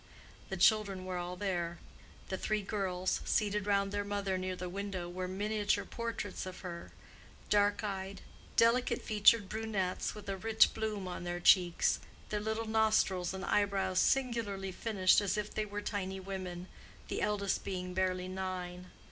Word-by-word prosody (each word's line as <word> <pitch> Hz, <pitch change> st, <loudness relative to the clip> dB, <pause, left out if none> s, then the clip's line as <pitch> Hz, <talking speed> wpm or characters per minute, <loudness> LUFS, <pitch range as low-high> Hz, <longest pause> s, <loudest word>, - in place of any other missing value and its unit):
The 190 Hz, -, -3 dB
children 195 Hz, -1 st, +3 dB
were 185 Hz, -1 st, -3 dB
all 175 Hz, +1 st, -4 dB
there. 175 Hz, -3 st, -2 dB, 0.5 s
The 190 Hz, -, -2 dB
three 215 Hz, -1 st, 0 dB
girls, 185 Hz, -3 st, -1 dB
seated 210 Hz, -1 st, +1 dB
round 200 Hz, -1 st, +2 dB
their 205 Hz, 0 st, -1 dB
mother 200 Hz, -1 st, -1 dB
near 185 Hz, 0 st, -2 dB
the 180 Hz, 0 st, -5 dB
window, 190 Hz, -1 st, -4 dB
were 180 Hz, +1 st, -4 dB
miniature 205 Hz, +2 st, 0 dB
portraits 230 Hz, -5 st, -4 dB
of 185 Hz, -, -8 dB
her—dark 205 Hz, +3 st, -2 dB
eyed, 195 Hz, -1 st, -4 dB, 0.3 s
delicate 230 Hz, +2 st, +3 dB
featured 210 Hz, 0 st, +5 dB
brunettes 210 Hz, -4 st, -2 dB
with 210 Hz, -, -10 dB
a 195 Hz, -1 st, -2 dB
rich 220 Hz, +3 st, +4 dB
bloom 215 Hz, -3 st, -3 dB
on 180 Hz, -, -5 dB
their 175 Hz, 0 st, -3 dB
cheeks, 175 Hz, -1 st, +4 dB, 0.3 s
their 210 Hz, -, -1 dB
little 220 Hz, +2 st, -2 dB
nostrils 220 Hz, -5 st, +2 dB
and 190 Hz, 0 st, -5 dB
eyebrows 195 Hz, -2 st, +1 dB
singularly 230 Hz, -7 st, +1 dB
finished 190 Hz, -1 st, +3 dB
as 205 Hz, 0 st, 0 dB
if 210 Hz, 0 st, -3 dB
they 215 Hz, -, -1 dB
were 205 Hz, 0 st, -4 dB
tiny 190 Hz, -2 st, -3 dB
women, 185 Hz, -2 st, -5 dB, 0.4 s
the -, -, -3 dB
eldest 205 Hz, -2 st, 0 dB
being 180 Hz, -1 st, -4 dB
barely 185 Hz, 0 st, 0 dB
nine. 185 Hz, -1 st, -5 dB
195 Hz, 155 wpm, -33 LUFS, 185-210 Hz, 0.5 s, featured